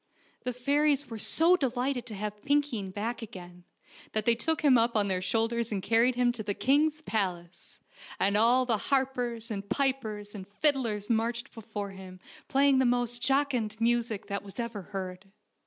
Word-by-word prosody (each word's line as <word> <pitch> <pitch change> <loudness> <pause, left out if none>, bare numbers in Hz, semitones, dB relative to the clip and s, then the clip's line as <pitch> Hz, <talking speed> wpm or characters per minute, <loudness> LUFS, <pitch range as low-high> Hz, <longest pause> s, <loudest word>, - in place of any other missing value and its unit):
The 250 - -1
fairies 285 +2 +1
were 225 - -5
so 330 - +5
delighted 255 -4 -1
to 220 - -7
have 210 +1 -5
Pinkeen 285 -9 0
back 225 +5 -4
again, 180 -4 -10 0.5
that 215 -1 -1
they 235 - +5
took 315 +7 -1
him 280 -3 +6
up 235 0 +2
on 205 -1 +1
their 185 -1 0
shoulders 225 +3 0
and 195 -3 -2
car 225 +1 +4
ried 250 +1 +3
him 245 0 +3
to 240 -2 -6
the 205 -1 -3
king's 300 +3 +2
palace, 185 - -4 0.4
and 200 +1 +2
all 240 +4 +4
the 230 -3 +1
harpers 250 -4 -1
and 200 -1 -5
pipers 220 -7 -1
and 190 -3 -8
fiddlers 230 -3 0
marched 230 +1 -1
before 210 -3 -6
him 190 -1 -11 0.3
play 280 +1 +3
ing 270 -1 +4
the - - +4
most 245 -1 +1
jocund 255 -5 0
music 230 -2 +1
that 200 0 -3
was 200 +3 -11
ever 235 -3 -4
heard. 185 0 -7
230 Hz, 180 wpm, -29 LUFS, 205-255 Hz, 0.5 s, him